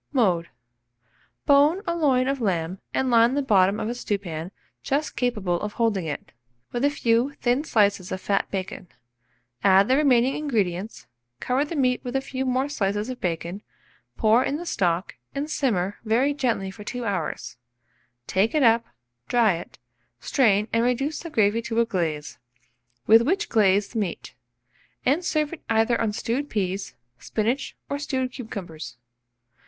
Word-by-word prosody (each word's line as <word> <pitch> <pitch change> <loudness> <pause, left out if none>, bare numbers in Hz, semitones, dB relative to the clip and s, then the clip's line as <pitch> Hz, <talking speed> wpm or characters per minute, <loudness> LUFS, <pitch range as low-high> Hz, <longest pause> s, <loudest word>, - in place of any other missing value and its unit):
Mode. 185 - +2 1.0
Bone 295 +7 +4
a 340 -2 -1
loin 265 -6 +2
of 275 -1 -1
lamb, 180 -3 -1
and 260 -1 0
line 235 +2 +5
the 285 - +1
bottom 200 -3 +3
of - - -2
a 235 - -1
stewpan 185 -8 -4 0.3
just 290 +3 -1
capable 210 -8 -1
of 210 0 -4
holding 220 -6 0
it, 145 - -6 0.4
with 240 +1 -2
a 285 - +5
few 245 -1 +1
thin 245 +4 +1
slices 200 - +1
of 185 - -3
fat 195 +1 0
bacon; 190 -1 -5 0.8
add 195 +1 +6
the 260 - +4
remaining 265 -3 +4
ingredients, 215 - -2 0.3
cover 255 +3 +1
the 300 +3 -5
meat 255 -3 +1
with 250 +1 -5
a - - +3
few 265 -1 -4
more 255 +2 +1
slices 210 -4 -1
of 255 - -8
bacon, 175 +2 -3 0.6
pour 225 +3 +4
in 285 - -1
the 345 - -7
stock, 180 - -1 0.2
and 290 +2 -3
simmer 205 -10 0
very 240 +6 +2
gently 235 -9 -1
for 210 +2 -11
2 245 +3 -5
hours; 195 - -3 0.7
take 200 - +1
it 300 - +3
up, 230 -1 +5 0.4
dry 230 -5 +4
it, 170 +1 -8 0.4
strain 210 - +2
and 230 0 +3
reduce 270 +5 0
the 335 - -7
gravy 220 -4 +2
to 230 0 -2
a 235 - +4
glaze, 160 - -3 0.7
with 225 +1 +7
which 385 - 0
glaze 200 -2 +3
the 230 - -3
meat, 190 -5 -4 0.7
and 290 +8 +2
serve 310 -2 0
it 340 - -8
either 225 +1 +2
on 225 -2 +1
stewed 240 +7 -2
peas, 195 -2 -2 0.2
spinach, 230 - -2
or 280 - -3
stewed 260 -3 -2
cucumbers. 180 - -7
230 Hz, 160 wpm, -25 LUFS, 195-270 Hz, 1.0 s, with